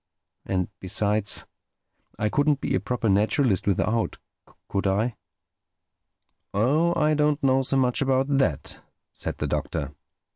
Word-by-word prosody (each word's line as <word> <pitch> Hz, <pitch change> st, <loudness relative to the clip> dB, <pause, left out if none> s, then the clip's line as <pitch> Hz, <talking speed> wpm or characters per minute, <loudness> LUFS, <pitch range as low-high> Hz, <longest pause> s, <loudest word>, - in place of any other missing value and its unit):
And 90 Hz, -2 st, 0 dB
besides, 105 Hz, +2 st, 0 dB, 0.7 s
I 105 Hz, -, 0 dB
couldn't 145 Hz, +4 st, +2 dB
be -, -, -2 dB
a -, -, +2 dB
proper 115 Hz, +4 st, -2 dB
naturalist 105 Hz, -, +2 dB
without, 110 Hz, +4 st, 0 dB, 0.5 s
could 100 Hz, 0 st, -1 dB
I?" 105 Hz, +5 st, 0 dB, 1.4 s
"Oh, 150 Hz, +11 st, +2 dB
I 155 Hz, 0 st, +3 dB
don't 150 Hz, -1 st, +1 dB
know 135 Hz, 0 st, +4 dB
so 135 Hz, +1 st, +1 dB
much 125 Hz, -1 st, +2 dB
about 135 Hz, -1 st, +2 dB
that," 80 Hz, -, -1 dB, 0.3 s
said -, -, -2 dB
the -, -, -2 dB
Doctor. 70 Hz, -3 st, -3 dB
115 Hz, 125 wpm, -25 LUFS, 100-140 Hz, 1.4 s, know